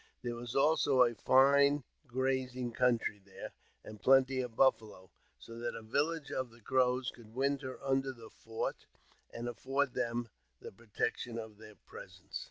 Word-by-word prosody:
There 120 -1 -2
was 120 0 -7
also 140 -2 +4
a 120 -1 +2
fine 140 +5 +4 0.2
grazing 130 -1 -1
■country 115 -5 +1
there, 95 0 -10 0.3
and 105 -1 -11
plenty 135 0 +4
of 125 -3 -6
buffalo, 110 -9 +1 0.3
so 115 0 -11
that 120 0 -3
a - - -7
village 145 +7 -1
of 130 -1 -2
the 115 +1 -18
Crows 125 +1 +1
could 115 -1 -16
winter 135 -1 -1
under 135 0 +1
the 115 -3 -13
fort, 115 0 -5 0.4
and 120 +1 -5
afford 135 +3 -1
them 120 -1 -2 0.3
the - - -9
pro 115 +4 -20
tection 115 +3 -2
of 110 -2 -8
their 105 -1 -13
presence. - - -10
125 Hz, 160 wpm, -33 LUFS, 115-135 Hz, 0.4 s, also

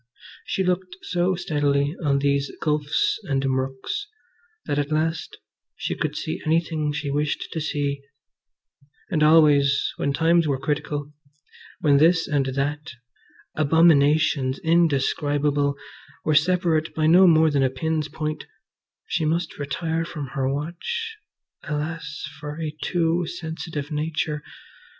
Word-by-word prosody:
She 190 - -1
looked 180 0 -1
so 180 +1 0
steadily 145 -2 0
on 140 -2 +2
these 140 0 +1
gulfs 150 +3 0
and 135 -5 0
murks 135 - -2 0.6
that 145 - -1
at 145 +1 -2
last 160 +1 -1 0.4
she - - -3
could - - -3
see - - -4
anything 160 -1 0
she 145 -1 -3
wished 145 +1 -1
to 160 - -3
see; 145 -2 -2 1.1
and 160 -4 +1
always, 150 -3 +5
when 140 - 0
times 165 +3 +3
were 140 -2 +1
critical, 145 +1 -3 0.7
when 145 -3 +4
this 165 +3 +4
and 140 -3 +1
that, 145 +2 -2 0.6
abominations 150 -3 +3
indescribable, 145 -3 +2 0.5
were 155 - +2
separate 165 0 +2
by 155 - +1
no 180 +4 +7
more 160 -2 +5
than 140 -1 +2
a 135 - +3
pin's 155 +3 -2
point, 155 -1 -4 0.6
she 165 - -1
must 165 +1 -1
retire 160 +3 -2
from 150 -5 -6
her 135 -1 -1
watch 180 - -4 0.5
(alas 155 0 -4 0.2
for 150 +1 -6
a 155 -2 -4
too 170 -1 0
sensitive 160 -3 -5
nature!) 150 0 -2
150 Hz, 125 wpm, -24 LUFS, 145-165 Hz, 1.1 s, no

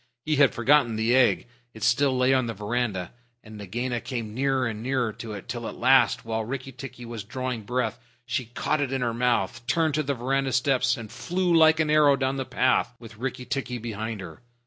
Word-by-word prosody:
He 155 -1 +1
had 140 -2 +4
forgotten 120 -1 +3
the 110 +3 +2
egg. 130 -2 +3 0.3
It 110 - -8
still 130 +3 +3
lay 130 +1 +3
on 130 -2 +2
the 115 - -4
veranda, 105 -3 -2 0.3
and 110 -1 -12
Nagaina 120 +4 -3
came 115 -3 -5
nearer 135 +1 +1
and 110 -2 -4
nearer 125 -2 -1
to 110 0 -7
it, 100 - -8
till 120 -2 -4
at - - -6
last, 130 0 +4
while 110 0 -2
Rikki 130 +3 -5
tikki 125 -1 -9
was 115 -3 -6
drawing 125 +2 -4
breath, 125 -1 -1 0.3
she 125 +1 -2
caught 140 +6 -1
it 135 -2 -1
in 135 -1 -1
her 120 -2 0
mouth, 120 -5 0
turned 160 -2 +2
to 155 - +1
the 140 -1 -2
veranda 135 +2 -1
steps, 125 -1 +2
and 110 -2 -8
flew 175 +8 -1
like 160 -1 +6
an 155 -1 +2
arrow 150 -2 +5
down 135 0 -1
the 130 - -2
path, 130 -1 +1
with 115 -2 -13
Rikki 125 0 -4
tikki 125 0 -3
behind 110 -2 -5
her. 90 +4 -10
125 Hz, 215 wpm, -26 LUFS, 115-135 Hz, 0.3 s, like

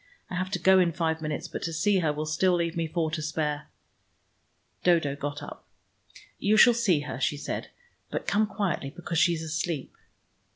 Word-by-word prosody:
I - - -3
have 185 +1 -1
to - - +2
go 190 0 +5
in 175 -2 +3
five 160 -1 -1
minutes, 155 +2 -3
but - - -6
to 165 - -2
see 195 +5 +2
her 160 -4 +1
will 150 +1 -3
still 175 +4 +2
leave 170 0 -1
me 165 -1 -1
four 160 -1 -1
to 160 -1 -2
spare." 150 -1 -2 1.1
Dodo 165 -6 +3
got 145 0 -5
up. - - -9 0.8
"You 210 +2 +3
shall 240 +2 +8
see 200 -10 +2
her," 130 -3 -6
she 145 +2 0
said. - - -4 0.4
"But - - -3
come 215 +1 +2
quietly, 195 -9 -2
because 165 +1 -3
she 175 -1 +4
is 160 - -5
asleep." 155 -2 -3
165 Hz, 195 wpm, -27 LUFS, 155-180 Hz, 1.1 s, shall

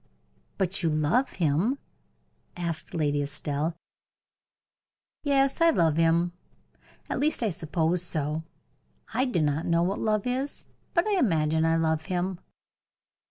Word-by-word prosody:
"But 190 0 0
you 165 - +2
love 155 - +1
him?" 175 - +1 0.8
asked 170 -2 -4
Lady 145 -3 +1
Estelle. 145 +3 -2 1.5
"Yes, 275 0 +2
I 335 - +7
love 165 - +3
him 165 +1 +3 0.7
at - - -2
least 295 -3 +1
I 215 - +1
suppose 165 +1 0
so. 155 -3 -1 0.7
I 260 - +2
do 185 - +1
not 150 +2 0
know 170 0 +3
what 190 +3 -1
love 215 -2 +1
is; 260 +3 -2 0.3
but 340 - +4
I 415 -3 +2
imagine 160 - +2
I 165 0 +3
love 160 -1 +1
him." 185 -1 -2
170 Hz, 130 wpm, -27 LUFS, 155-215 Hz, 1.5 s, I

